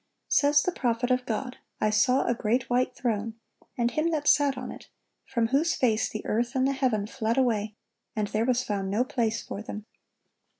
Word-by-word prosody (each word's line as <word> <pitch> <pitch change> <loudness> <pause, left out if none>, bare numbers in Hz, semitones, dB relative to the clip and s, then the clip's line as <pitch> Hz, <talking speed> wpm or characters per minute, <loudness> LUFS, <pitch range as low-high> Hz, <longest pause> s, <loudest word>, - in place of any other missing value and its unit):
Says 290 0 +4
the 360 - 0
prophet 245 -4 -1
of 250 0 +1
God: 250 +3 -3 0.2
"I 215 - +2
saw 250 +5 +3
a - - +2
great 240 +2 -1
white 250 +1 +1
throne, 225 -2 -2 0.4
and 240 -1 +1
Him 310 +5 +1
that 300 -3 -1
sat 285 -3 +4
on - - -5
it, - - -12 0.4
from 235 -3 0
whose 300 +6 +2
face 225 -4 +1
the 215 - -6
earth 240 +4 -1
and 260 0 +3
the - - +2
heaven 250 -7 0
fled 230 +1 -2
away; 215 -5 +1 0.4
and 210 -1 0
there 215 +2 0
was 255 0 +1
found 200 -4 -2
no 210 +5 +2
place 235 -4 -1
for 200 - -6
them. 215 -1 -7
240 Hz, 200 wpm, -27 LUFS, 220-260 Hz, 0.4 s, Says